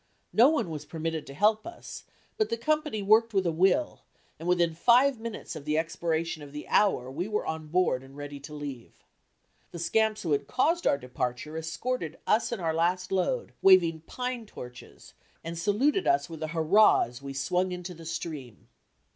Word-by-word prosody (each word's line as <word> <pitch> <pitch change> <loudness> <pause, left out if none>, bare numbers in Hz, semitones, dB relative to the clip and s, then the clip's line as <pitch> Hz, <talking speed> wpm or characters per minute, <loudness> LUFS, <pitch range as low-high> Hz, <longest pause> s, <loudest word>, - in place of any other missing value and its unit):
No 240 +5 +7
one 300 - 0
was 150 -2 -5
permitted 160 -2 -4
to 135 - -8
help 215 - +2
us, 345 - -9 0.3
but 435 -1 0
the 230 - -1
company 300 -3 -1
worked 220 +2 +4
with 190 -1 +2
a 170 - +2
will 190 - +2 0.4
and 165 - -6
within 175 -2 +2
five 245 +8 +4
minutes 225 -6 -6
of 155 - -7
the 150 +1 0
expiration 165 0 -1
of 145 -1 -11
the 150 - -7
hour 130 -11 +2
we 170 +8 -3
were 210 -1 -2
on 160 -1 -4
board 170 -5 +1
and 135 +1 -14
ready 145 0 -7
to 140 +2 -10
leave. 140 -5 -7 0.8
The - - -9
scamps 220 +5 +1
who 165 - -2
had 140 -1 +1
caused 325 +7 +1
our - - +3
departure 125 +3 -4
escorted 160 +3 -3
us 220 +2 +2
and 235 - -3
our 165 -2 -1
last 180 +3 0
load, 470 - -1
waving 170 -4 +5
pine 250 -3 -4
torches, 125 -9 -11 0.3
and 165 +1 -5
saluted 230 - +1
us 350 - +3
with 160 -2 -9
a 155 - -2
hurrah 170 +7 +5
as 120 +2 -8
we 140 0 -6
swung 180 +7 0
into 180 0 -6
the 165 -1 -11
stream. 145 - -6
170 Hz, 190 wpm, -28 LUFS, 155-220 Hz, 0.8 s, No